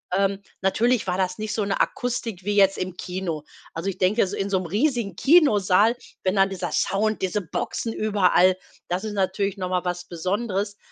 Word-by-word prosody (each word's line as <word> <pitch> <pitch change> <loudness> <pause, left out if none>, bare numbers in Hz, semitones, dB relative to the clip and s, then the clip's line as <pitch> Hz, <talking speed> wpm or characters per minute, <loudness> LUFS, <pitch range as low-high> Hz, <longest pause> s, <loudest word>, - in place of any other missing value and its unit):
Ähm, 195 0 +1 0.2
natürlich 225 +4 +2
war 180 0 0
das 185 +1 -1
nicht 215 0 -3
so 215 - 0
'ne 200 - -1
Akustik 230 -6 -2
wie 205 +1 -1
jetzt 195 -1 +4
im 185 -1 -4
Kino. 180 -4 -4 0.3
Also, 165 +4 -3
ich 195 - -5
denke, 195 +5 +2
s 190 - 0
in 195 0 -2
so 190 - +2
'nem 180 - -5
riesigen 230 - 0
Kinosaal, 225 - +4 0.3
wenn 185 +1 +1
dann 195 0 +4
dieser 190 -2 -4
Sound, 215 +2 0
diese 190 +3 0
Boxen 215 +5 -3
überall, 185 -4 +3 0.3
das 180 +3 -2
ist 215 -1 -4
natürlich 195 0 -1
noch 185 -1 -3
mal 180 -1 0
was 180 0 -3
Besonderes. 200 +3 -2
195 Hz, 190 wpm, -24 LUFS, 185-215 Hz, 0.3 s, jetzt